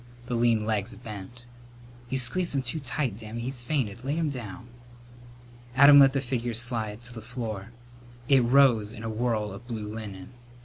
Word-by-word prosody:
The 125 - -4
lean 115 -2 +2
legs 110 0 -1
bent. 115 +1 -9 0.6
"You 130 - 0
squeezed 145 +7 -1
him 135 - +1
too 130 +6 -3
tight, 135 -5 -2
Dammy. 110 +1 -6
He's 125 +1 -4
fainted. 120 -4 -2
Lay 140 +3 -1
him 160 -3 0
down." 120 -4 -7 1.1
Adam 140 +2 +9
let 135 -1 +7
the 135 - 0
figure 120 -2 -2
slide 115 -2 -1
to 120 +1 -4
the 115 - -8
floor. 110 -3 -5 0.6
It 135 -2 +5
rose 120 -4 +4
in 115 -2 -9
a 115 - -3
whirl 110 -2 -1
of 120 +5 -10
blue 110 -3 -4
linen. 105 -3 -7
Mrs. - - -19
120 Hz, 180 wpm, -27 LUFS, 110-130 Hz, 1.1 s, Adam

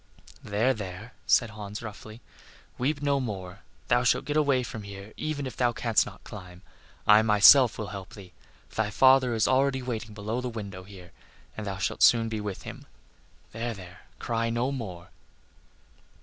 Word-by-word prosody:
"There, 110 +6 +1
there," 105 +2 -8
said 120 -3 +3
Hans, 105 +1 -7
roughly, 110 +1 -9 0.6
"weep 145 +3 -1
no 140 -1 +2
more. 95 -6 -5 0.3
Thou 120 0 +3
shalt 125 +2 +2
get 145 - -3
away 140 -4 +2
from 110 -2 -7
here 100 +1 -10
even 150 -2 -3
if 130 - -6
thou 120 -1 +1
canst 115 -1 +1
not - - -12
climb; 90 -3 -11 0.4
I 105 +1 +7
myself 110 +3 +7
will 110 -3 -5
help 95 -2 -8
thee. 95 -3 -13 0.4
Thy 110 -1 0
father 130 +2 +4
is 110 - +2
already 130 0 +2
waiting 115 -3 -5
below 110 +4 -3
the 125 - -3
window 100 -5 -7
here, 95 -3 -13 0.4
and 105 -1 -6
thou 100 0 -3
shalt 95 - -2
soon 115 -1 +5
be 110 -1 -3
with 105 -2 -6
him. - - -9 0.6
There, 115 +1 -4
there, 90 -2 -12 0.2
cry 115 -1 -1
no 120 +3 -1
more." 95 -10 -7
110 Hz, 170 wpm, -27 LUFS, 100-125 Hz, 0.6 s, I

